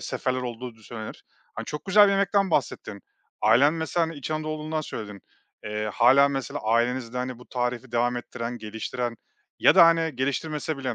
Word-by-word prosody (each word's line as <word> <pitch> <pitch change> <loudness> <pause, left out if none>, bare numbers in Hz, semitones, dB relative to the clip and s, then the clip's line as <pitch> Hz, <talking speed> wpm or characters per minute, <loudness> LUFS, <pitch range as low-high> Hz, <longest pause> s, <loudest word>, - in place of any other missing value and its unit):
seferler 130 -2 -2
olduğu 120 0 -6
du 110 - -22
söylenir. 110 0 -9 0.3
Hani, - - -5
çok 150 - -6
güzel 205 +1 +6
bir 200 - +2
yemekten 195 0 +2
bahsettin. 120 -8 -2 0.4
Ailen 140 +5 +5
mesela, 165 +1 0
hani, 165 - -7
İç 140 +1 -6
Anadolulu 155 0 -3
olduğundan 155 0 -2
söyledin. 105 -8 -7 0.4
Eee, 105 0 -3
hâlâ 135 +4 +6
mesela 135 -3 -4
ailenizde, 120 +2 0
hani, 125 -1 -4
bu 125 - -15
tarifi 125 0 -3
devam 120 +1 +1
ettiren, 120 0 -5
geliştiren 115 +2 -4 0.4
ya - - +5
da, 175 -3 +9
hani, 165 -3 +2
geliştirmese 150 +4 -2
bile 130 -3 -3
130 Hz, 175 wpm, -25 LUFS, 120-155 Hz, 0.4 s, da